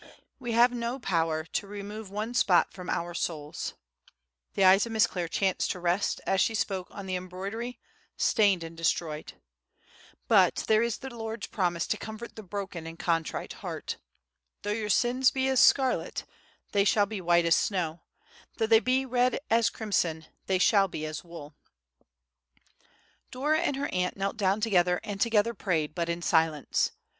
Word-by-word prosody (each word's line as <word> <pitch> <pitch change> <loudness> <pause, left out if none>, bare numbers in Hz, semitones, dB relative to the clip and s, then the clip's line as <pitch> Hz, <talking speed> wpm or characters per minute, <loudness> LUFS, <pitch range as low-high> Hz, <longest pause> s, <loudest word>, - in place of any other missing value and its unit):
We 240 -3 -3
have 240 +2 +5
no 240 +1 -3
power 165 -8 0
to 200 +4 -3
remove 205 +1 -7
one 215 +4 -4
spot 190 -7 +3
from 180 -1 -8
our 175 +1 -2
souls;" 155 -3 -4 0.8
the 195 - +2
eyes 195 +4 +6
of - - -7
Miss 220 -1 +5
Clare 175 -2 -3
chanced 190 +3 0
to 180 - -3
rest, 175 +3 0
as 195 - +2
she 225 - +1
spoke, 190 -3 -2
on 200 - -8
the 185 -1 -2
embroidery, 195 +7 -5 0.4
stained 200 -5 +3
and 165 0 -8
destroyed; 165 -2 -2 0.9
"but - - +4
there 215 0 +4
is 235 0 0
the 265 -2 -8
Lord's 225 -1 -5
promise 175 -4 -1
to 215 - -1
comfort 220 +2 -8
the 220 - -7
broken 190 -4 -6
and 165 0 -8
contrite 165 -2 -1
heart, - - -5 0.7
'Though 205 - -1
your 210 0 -2
sins 250 +5 +3
be 265 0 -1
as 265 -2 +3
scarlet, 265 -2 +3 0.5
they 200 -1 +3
shall 205 0 +3
be 205 -1 -5
white 170 -1 +3
as 165 - +5
snow—though 175 +3 -4
they 220 0 +6
be 255 +3 +1
red 250 0 +2
as 230 -1 +4
crimson, 170 -7 -1 0.2
they 190 - +2
shall 195 +1 +4
be 155 -4 -5
as 155 0 -5
wool.'" 165 -4 -10 1.8
Dora 295 +5 +1
and 285 - 0
her 280 +1 -2
aunt 180 +1 -1
knelt 195 +2 -2
down 200 0 +1
together 180 -5 +3
and 200 -1 -5
together 230 0 +3
prayed, 160 -8 -1
but 170 0 -2
in 170 0 -3
silence. 160 -3 +2
200 Hz, 170 wpm, -28 LUFS, 175-225 Hz, 1.8 s, eyes